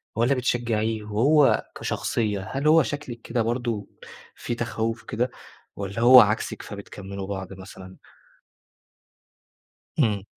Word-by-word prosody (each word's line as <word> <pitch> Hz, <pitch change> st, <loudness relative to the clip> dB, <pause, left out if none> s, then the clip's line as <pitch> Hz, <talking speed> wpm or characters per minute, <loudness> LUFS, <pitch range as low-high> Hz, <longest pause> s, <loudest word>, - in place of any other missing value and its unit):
والّا 120 Hz, +4 st, +3 dB
بتشجّعيه؟ 115 Hz, -3 st, -1 dB
وهو 135 Hz, +8 st, +3 dB
كشخصية، 105 Hz, -4 st, -2 dB
هل 140 Hz, +3 st, -1 dB
هو 160 Hz, +1 st, +6 dB
شكلِك 145 Hz, -5 st, -6 dB
كده 120 Hz, -, -1 dB
برضه 115 Hz, -3 st, -2 dB, 0.5 s
في 120 Hz, -, -4 dB
تخوّف 115 Hz, -1 st, -3 dB
كده 120 Hz, +4 st, -2 dB, 0.4 s
والّا 100 Hz, +2 st, -5 dB
هو 125 Hz, +1 st, +10 dB
عكسِك، 105 Hz, 0 st, 0 dB
فبتكمِّلوا 100 Hz, -1 st, -8 dB
بعض 95 Hz, -1 st, -5 dB
مثلًا؟ 95 Hz, -1 st, -11 dB, 2.0 s
إمم. 105 Hz, -8 st, +2 dB
115 Hz, 110 wpm, -25 LUFS, 100-120 Hz, 2.0 s, هو